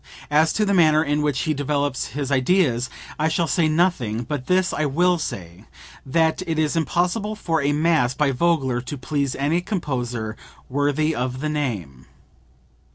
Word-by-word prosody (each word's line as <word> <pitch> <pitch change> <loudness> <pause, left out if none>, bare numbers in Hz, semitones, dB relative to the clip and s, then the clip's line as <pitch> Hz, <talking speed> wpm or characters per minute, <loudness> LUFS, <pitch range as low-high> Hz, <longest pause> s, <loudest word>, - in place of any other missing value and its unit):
As 155 +2 +4
to 215 - +1
the 200 - +1
manner 155 -4 +5
in 145 0 0
which 145 -3 0
he 155 - 0
develops 145 -1 -1
his 140 -1 -2
ideas 130 -3 +2 0.3
I 155 - +2
shall 165 +1 +1
say 165 0 +2
nothing; 155 - +1
but 135 0 -5
this 185 0 +2
I 155 - 0
will 175 +5 +2
say 90 - -6 0.4
that 160 +5 +2
it 160 -1 -1
is 155 0 +1
impossible 180 +6 0
for 165 -7 -1
a 140 +1 +1
mass 150 -5 +2
by 145 -1 +2
Vogler 135 -4 +1
to 130 +4 -6
please 140 0 -2
any 150 +6 0
composer 125 - -3 0.3
worthy 145 +3 +1
of 125 -1 -3
the 155 +2 -2
name. 105 - -4
150 Hz, 165 wpm, -22 LUFS, 130-165 Hz, 0.4 s, manner